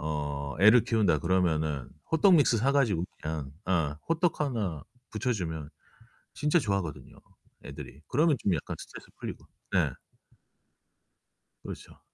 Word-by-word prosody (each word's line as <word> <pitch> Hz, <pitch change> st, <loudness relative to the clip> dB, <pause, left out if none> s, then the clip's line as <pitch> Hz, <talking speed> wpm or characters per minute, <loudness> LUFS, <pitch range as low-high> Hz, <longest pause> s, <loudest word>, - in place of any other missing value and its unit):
어 75 Hz, -2 st, -3 dB
애를 110 Hz, +4 st, +7 dB
키운다 105 Hz, -9 st, +2 dB
그러면은 80 Hz, -5 st, 0 dB, 0.2 s
호떡 180 Hz, +3 st, +6 dB
믹스 140 Hz, -6 st, +4 dB
사 125 Hz, +5 st, +2 dB
가지고 115 Hz, -12 st, +2 dB, 0.2 s
그냥 75 Hz, -3 st, -4 dB
어 80 Hz, -6 st, 0 dB
호떡 165 Hz, +1 st, +1 dB
하나 105 Hz, -, -2 dB, 0.3 s
부쳐 125 Hz, +4 st, -1 dB
주면 80 Hz, -7 st, -4 dB, 0.6 s
진짜 150 Hz, +4 st, +2 dB
좋아하거든요, 100 Hz, -, -3 dB, 0.5 s
애들이. 75 Hz, -, -9 dB
그러면 150 Hz, +2 st, +3 dB
좀 100 Hz, -, 0 dB
약간 75 Hz, -, -4 dB
스트레스 -, -, -10 dB
풀리고 -, -, -7 dB, 0.3 s
예. -, -, +2 dB, 1.7 s
그렇죠. -, -, -9 dB
95 Hz, 280 characters per minute, -29 LUFS, 75-130 Hz, 1.7 s, 애를